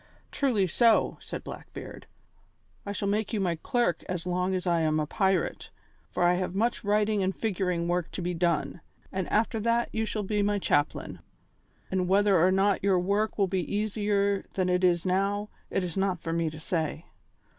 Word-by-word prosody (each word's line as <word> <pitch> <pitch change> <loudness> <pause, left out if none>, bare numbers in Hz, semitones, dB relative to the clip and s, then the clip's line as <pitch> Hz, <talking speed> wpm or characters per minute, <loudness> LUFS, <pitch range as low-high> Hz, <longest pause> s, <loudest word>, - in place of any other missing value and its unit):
"Truly 245 -9 +1
so," 225 +6 +3
said - - -6
Blackbeard. - - -9 0.8
"I - - -2
shall 200 0 -2
make 210 +3 0
you 215 - 0
my 175 -4 0
clerk 235 -9 0
as 180 -1 -3
long 180 +1 0
as 185 - -3
I 170 -2 +2
am 155 -1 +2
a 155 - 0
pirate, 190 +2 0 0.4
for - - -1
I 175 0 +5
have 180 0 -2
much 230 +4 0
writing 210 0 +2
and 190 0 0
figuring 180 -5 -1
work 175 -1 0
to - - -4
be 180 +1 -1
done, 165 -3 0 0.3
and 190 -2 -3
after 225 +1 +1
that 235 +2 +1
you 220 0 -1
shall 210 -1 -2
be 210 +1 0
my 205 0 +1
chaplain. 145 -6 0 0.7
And 185 -1 0
whether 195 -2 +4
or 185 - +5
not 195 +1 +2
your 195 -2 +3
work 200 +4 0
will 200 - +3
be 190 0 -1 0.2
easier 205 -1 0
than 185 -1 +1
it 180 +1 +1
is 175 -1 +3
now, 200 +3 0 0.2
it 195 - 0
is 175 -2 -4
not 190 -2 0
for 165 0 -4
me 165 -1 0
to 155 0 -9
say." 160 -1 -2
190 Hz, 190 wpm, -28 LUFS, 175-205 Hz, 0.8 s, I